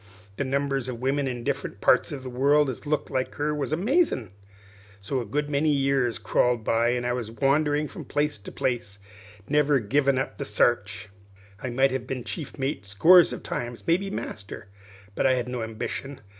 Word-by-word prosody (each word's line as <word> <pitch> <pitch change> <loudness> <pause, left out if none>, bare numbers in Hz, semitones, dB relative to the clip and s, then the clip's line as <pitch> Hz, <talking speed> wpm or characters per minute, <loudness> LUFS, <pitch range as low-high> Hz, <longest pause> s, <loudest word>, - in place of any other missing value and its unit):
The - - 0
numbers 135 -1 -1
of 120 -2 -5
women 135 +2 0
in 120 -2 -4
different - - -3
parts - - +3
of 135 -3 -6
the 130 - -6
world 140 +3 +3
as 130 - -10
looked 150 0 -1
like 130 0 -2
her 150 +1 -1
was 150 -1 -3
amazin'. 185 - +1 0.7
So 115 +7 -2
a 120 - -5
good 145 +7 -1
many 145 +1 +1
years 135 -4 +1
crawled 125 -2 +1
by, 115 +2 +2
an' 120 0 -2
I 125 - +1
wandered 140 +5 0
from - - -8
place 145 -5 -1
to 100 - -10
place, 120 -6 -2 0.5
never 150 -1 +3
givin' 135 +5 +2
up 130 - -3
the - - -1
sarch. 105 -6 0 0.5
I 130 - -3
might 135 +2 +2
have 130 -1 -3
been 130 -2 -4
chief 155 +3 -6
mate 135 -5 -2
scores 160 - +6
of - - -6
times, 120 -1 -4
maybe 185 +4 +1
master; 100 - -7 0.4
but 135 - +2
I 130 - +4
hadn't 125 0 -3
no 125 -2 -3
ambition. 115 +5 -5
135 Hz, 185 wpm, -26 LUFS, 120-145 Hz, 0.7 s, scores